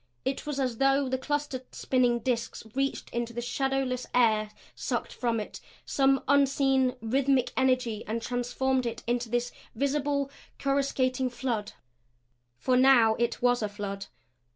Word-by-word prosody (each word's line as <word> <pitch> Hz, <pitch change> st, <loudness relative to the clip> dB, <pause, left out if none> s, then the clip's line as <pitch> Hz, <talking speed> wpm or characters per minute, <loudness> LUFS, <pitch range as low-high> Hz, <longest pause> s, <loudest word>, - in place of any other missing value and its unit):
It 270 Hz, +2 st, -2 dB
was 290 Hz, -2 st, -2 dB
as 250 Hz, -4 st, -1 dB
though 275 Hz, 0 st, +3 dB
the 260 Hz, 0 st, -1 dB
clustered, 290 Hz, -2 st, -3 dB
spinning 245 Hz, -2 st, +2 dB
disks 235 Hz, -1 st, -2 dB
reached 275 Hz, +1 st, -2 dB
into 235 Hz, 0 st, -3 dB
the 240 Hz, -, -4 dB
shadowless 265 Hz, 0 st, -1 dB
air, 215 Hz, -3 st, +3 dB, 0.2 s
sucked -, -, -3 dB
from 235 Hz, -2 st, 0 dB
it 210 Hz, -, -7 dB, 0.2 s
some 270 Hz, -1 st, +2 dB
unseen, 270 Hz, -2 st, +3 dB
rhythmic 260 Hz, +2 st, +2 dB
energy 255 Hz, -4 st, +1 dB
and 225 Hz, +2 st, -1 dB
transformed 245 Hz, +2 st, -1 dB
it 230 Hz, 0 st, -5 dB
into 240 Hz, 0 st, -1 dB
this 240 Hz, +1 st, 0 dB, 0.2 s
visible, 280 Hz, 0 st, 0 dB, 0.3 s
coruscating 270 Hz, -2 st, +1 dB
flood. 235 Hz, -4 st, -3 dB, 0.8 s
For 255 Hz, -, +1 dB
now 250 Hz, -4 st, +6 dB
it 235 Hz, 0 st, -1 dB
was 245 Hz, -1 st, +3 dB
a 210 Hz, -, -1 dB
flood. 200 Hz, -1 st, -5 dB
255 Hz, 140 wpm, -28 LUFS, 235-270 Hz, 0.8 s, now